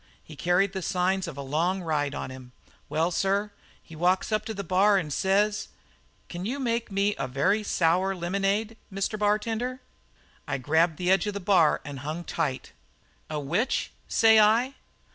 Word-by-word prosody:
He 155 Hz, -, -12 dB
carried 180 Hz, +5 st, +1 dB
the 190 Hz, -, -3 dB
signs 185 Hz, +1 st, 0 dB
of 160 Hz, -4 st, -7 dB
a 140 Hz, -, -5 dB
long 170 Hz, +7 st, 0 dB
ride 145 Hz, -3 st, -1 dB
on -, -, -5 dB
him. 130 Hz, -1 st, -11 dB, 0.4 s
Well, 165 Hz, +3 st, +1 dB
sir, 200 Hz, +3 st, 0 dB, 0.3 s
he 165 Hz, -, -13 dB
walks 180 Hz, +6 st, +1 dB
up 215 Hz, -, 0 dB
to 220 Hz, -, -4 dB
the 200 Hz, -, -4 dB
bar 195 Hz, +3 st, +3 dB
and 155 Hz, -6 st, -2 dB
says: 205 Hz, +4 st, +1 dB, 0.6 s
'Can 175 Hz, 0 st, -6 dB
you 250 Hz, +8 st, -3 dB
make 235 Hz, -4 st, -1 dB
me 200 Hz, +1 st, +1 dB
a -, -, -1 dB
very 155 Hz, +12 st, +1 dB
sour 185 Hz, 0 st, +1 dB
lemonade, 200 Hz, +5 st, -1 dB
Mr. 195 Hz, +2 st, -2 dB
Bartender?' 225 Hz, +4 st, 0 dB, 0.7 s
"I 140 Hz, -, -1 dB
grabbed 160 Hz, +4 st, +2 dB
the 180 Hz, 0 st, +1 dB
edge 195 Hz, +2 st, +3 dB
of 205 Hz, -, -3 dB
the -, -, -2 dB
bar 180 Hz, -5 st, +3 dB
and 145 Hz, -2 st, -6 dB
hung 155 Hz, +5 st, -5 dB
tight. 135 Hz, -5 st, -3 dB, 0.6 s
"'A 155 Hz, -1 st, -2 dB
which?' 175 Hz, -, -1 dB, 0.2 s
says 220 Hz, -1 st, +5 dB
I. 230 Hz, +5 st, +4 dB
190 Hz, 175 wpm, -27 LUFS, 160-210 Hz, 0.7 s, says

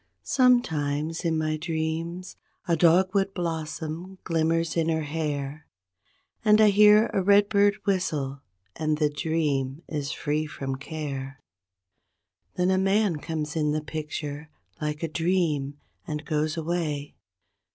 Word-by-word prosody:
Sometimes 160 Hz, -, +2 dB
in 165 Hz, -2 st, +1 dB
my 155 Hz, 0 st, 0 dB
dreams, 165 Hz, +2 st, -3 dB, 0.3 s
a 170 Hz, -, +3 dB
dogwood 190 Hz, +4 st, +3 dB
blossom 165 Hz, +1 st, -4 dB
glim¬ 165 Hz, -2 st, +1 dB
mers 165 Hz, 0 st, 0 dB
in 165 Hz, -1 st, +1 dB
her 160 Hz, -1 st, 0 dB
hair. 150 Hz, -1 st, -3 dB, 0.8 s
And 215 Hz, -1 st, +5 dB
I 215 Hz, -1 st, +7 dB
hear 210 Hz, +2 st, +6 dB
a 195 Hz, -, +2 dB
redbird 205 Hz, +1 st, +4 dB
whistle, 150 Hz, -8 st, -1 dB, 0.3 s
and 155 Hz, -1 st, 0 dB
the 150 Hz, -1 st, +1 dB
dream 145 Hz, -2 st, -1 dB
is 145 Hz, -2 st, -3 dB
free 150 Hz, +2 st, -1 dB
from 135 Hz, -2 st, -4 dB
care— 135 Hz, -2 st, -6 dB, 1.2 s
Then 180 Hz, +1 st, +2 dB
a 185 Hz, -, +3 dB
man 195 Hz, -2 st, +2 dB
comes 150 Hz, 0 st, -4 dB
in 150 Hz, -2 st, +1 dB
the 155 Hz, 0 st, -2 dB
picture, 150 Hz, -1 st, -5 dB, 0.3 s
like 150 Hz, +1 st, -3 dB
a -, -, +1 dB
dream, 160 Hz, -4 st, 0 dB, 0.3 s
and 150 Hz, 0 st, -4 dB
goes 155 Hz, +1 st, -1 dB
away. 155 Hz, -3 st, -2 dB
160 Hz, 130 wpm, -26 LUFS, 150-180 Hz, 1.2 s, I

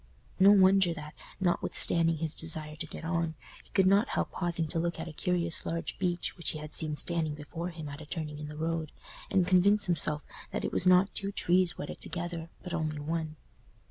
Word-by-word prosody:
No 195 Hz, +1 st, +7 dB
wonder 190 Hz, -3 st, +5 dB
that, 150 Hz, -1 st, -9 dB, 0.3 s
not 180 Hz, -2 st, +1 dB
withstanding 165 Hz, -1 st, +2 dB
his 160 Hz, 0 st, -2 dB
desire 155 Hz, -1 st, +5 dB
to 160 Hz, +1 st, -5 dB
get 160 Hz, -, -8 dB
on, 165 Hz, -1 st, -1 dB, 0.3 s
he -, -, -24 dB
could 190 Hz, -, +2 dB
not 200 Hz, +6 st, +3 dB
help -, -, -2 dB
pausing 170 Hz, -2 st, -1 dB
to 165 Hz, -, -2 dB
look 170 Hz, 0 st, -2 dB
at 165 Hz, -, -5 dB
a 165 Hz, -, -8 dB
curious 170 Hz, 0 st, +1 dB
large 165 Hz, 0 st, -4 dB
beech 175 Hz, -2 st, -2 dB
which 170 Hz, -, 0 dB
he -, -, -5 dB
had 150 Hz, 0 st, -8 dB
seen 155 Hz, -2 st, 0 dB
standing 160 Hz, -1 st, 0 dB
before 165 Hz, +4 st, -6 dB
him 165 Hz, -3 st, -8 dB
at 145 Hz, +2 st, -8 dB
a 155 Hz, -, -11 dB
turning 150 Hz, -2 st, -5 dB
in 150 Hz, -, -6 dB
the 150 Hz, 0 st, -9 dB
road, 160 Hz, -1 st, -3 dB, 0.4 s
and 185 Hz, -2 st, +2 dB
convince 195 Hz, +3 st, +4 dB
himself 150 Hz, -3 st, +2 dB, 0.3 s
that -, -, -3 dB
it -, -, -2 dB
was 185 Hz, -, +1 dB
not 185 Hz, +2 st, +5 dB
two 200 Hz, 0 st, -1 dB
trees 180 Hz, -2 st, +1 dB
wedded 145 Hz, -, -7 dB
together, 170 Hz, -1 st, -5 dB
but 180 Hz, -2 st, -7 dB
only 155 Hz, -2 st, -2 dB
one. 155 Hz, +1 st, -4 dB
165 Hz, 210 wpm, -29 LUFS, 155-180 Hz, 0.4 s, No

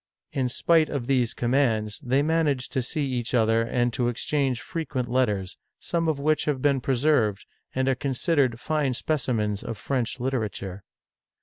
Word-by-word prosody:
In 130 Hz, -2 st, 0 dB
spite 160 Hz, +4 st, +3 dB
of 140 Hz, -5 st, -3 dB
these 125 Hz, -3 st, +1 dB
commands, 120 Hz, -4 st, +1 dB
they 135 Hz, 0 st, +1 dB
managed 150 Hz, -5 st, 0 dB
to 130 Hz, -, +1 dB
see 145 Hz, +4 st, -2 dB
each 125 Hz, -2 st, -2 dB
other 115 Hz, -1 st, +3 dB
and 120 Hz, +1 st, 0 dB
to 120 Hz, -1 st, 0 dB
exchange 130 Hz, +1 st, 0 dB
frequent 130 Hz, -2 st, -3 dB
letters, 105 Hz, -7 st, 0 dB, 0.2 s
some 165 Hz, -1 st, -1 dB
of 155 Hz, -, 0 dB
which 150 Hz, +2 st, +1 dB
nave 145 Hz, -3 st, +1 dB
been 140 Hz, -1 st, +2 dB
preserved, 125 Hz, -6 st, +1 dB, 0.3 s
and 130 Hz, 0 st, +1 dB
are 135 Hz, -, +4 dB
considered 130 Hz, -1 st, +1 dB
fine 150 Hz, -4 st, 0 dB
specimens 115 Hz, -9 st, -1 dB
of 115 Hz, -, -5 dB
French 130 Hz, 0 st, -2 dB
literature. 105 Hz, -7 st, -3 dB
130 Hz, 160 wpm, -26 LUFS, 120-145 Hz, 0.3 s, are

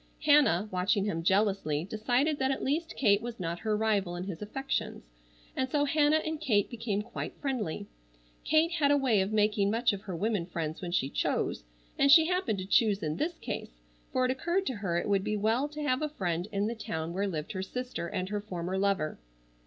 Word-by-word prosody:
Hannah, 280 Hz, -, +5 dB
watching 190 Hz, +2 st, +1 dB
him 165 Hz, -6 st, -1 dB
jealously, 190 Hz, -5 st, +1 dB
decided 245 Hz, -, 0 dB
that 265 Hz, 0 st, +1 dB
at 270 Hz, -, -1 dB
least 325 Hz, +5 st, -1 dB
Kate 205 Hz, -5 st, +4 dB
was 235 Hz, -1 st, -6 dB
not 170 Hz, -1 st, -3 dB
her 215 Hz, -1 st, 0 dB
rival 205 Hz, -5 st, +1 dB
in 175 Hz, -, -4 dB
his 185 Hz, -4 st, -6 dB
affections, 270 Hz, +6 st, -3 dB, 0.5 s
and 260 Hz, 0 st, -1 dB
so 290 Hz, +1 st, +2 dB
Hannah 300 Hz, +1 st, +3 dB
and 315 Hz, -1 st, -3 dB
Kate 215 Hz, -9 st, +2 dB
became 220 Hz, -3 st, -2 dB
quite 240 Hz, -, -6 dB
friendly. 235 Hz, -, -2 dB, 0.6 s
Kate 315 Hz, +2 st, +3 dB
had 310 Hz, -5 st, +2 dB
a 285 Hz, -, +5 dB
way 245 Hz, -8 st, +3 dB
of 190 Hz, +2 st, -1 dB
making 210 Hz, -1 st, +2 dB
much 230 Hz, +1 st, +2 dB
of 195 Hz, -, -5 dB
her 190 Hz, -4 st, -6 dB
women 200 Hz, -1 st, -1 dB
friends 165 Hz, -2 st, -4 dB
when 180 Hz, -, -4 dB
she 155 Hz, -7 st, +1 dB
chose, -, -, -1 dB, 0.3 s
and 275 Hz, 0 st, +5 dB
she 320 Hz, +1 st, +9 dB
happened 360 Hz, -, 0 dB
to 185 Hz, -, -4 dB
choose 205 Hz, 0 st, +3 dB
in 155 Hz, 0 st, -2 dB
this 330 Hz, -, -2 dB
case, -, -, -6 dB, 0.3 s
for 255 Hz, -, +2 dB
it 255 Hz, -, +2 dB
occurred 345 Hz, +9 st, 0 dB
to 260 Hz, -, -2 dB
her 185 Hz, -4 st, -1 dB
it -, -, -1 dB
would 200 Hz, -1 st, +2 dB
be 215 Hz, +1 st, -1 dB
well 225 Hz, +7 st, +1 dB
to 300 Hz, 0 st, -6 dB
have 255 Hz, -2 st, +1 dB
a 305 Hz, -, -1 dB
friend 175 Hz, -, -2 dB
in 200 Hz, 0 st, 0 dB
the 225 Hz, -, -1 dB
town 170 Hz, -8 st, -4 dB
where 200 Hz, +2 st, 0 dB
lived 155 Hz, -5 st, -4 dB
her 185 Hz, -, -3 dB
sister 250 Hz, -2 st, -4 dB
and 185 Hz, +2 st, -3 dB
her 210 Hz, 0 st, -2 dB
former 185 Hz, -2 st, -3 dB
lover. 195 Hz, -, 0 dB
210 Hz, 215 wpm, -30 LUFS, 185-270 Hz, 0.6 s, she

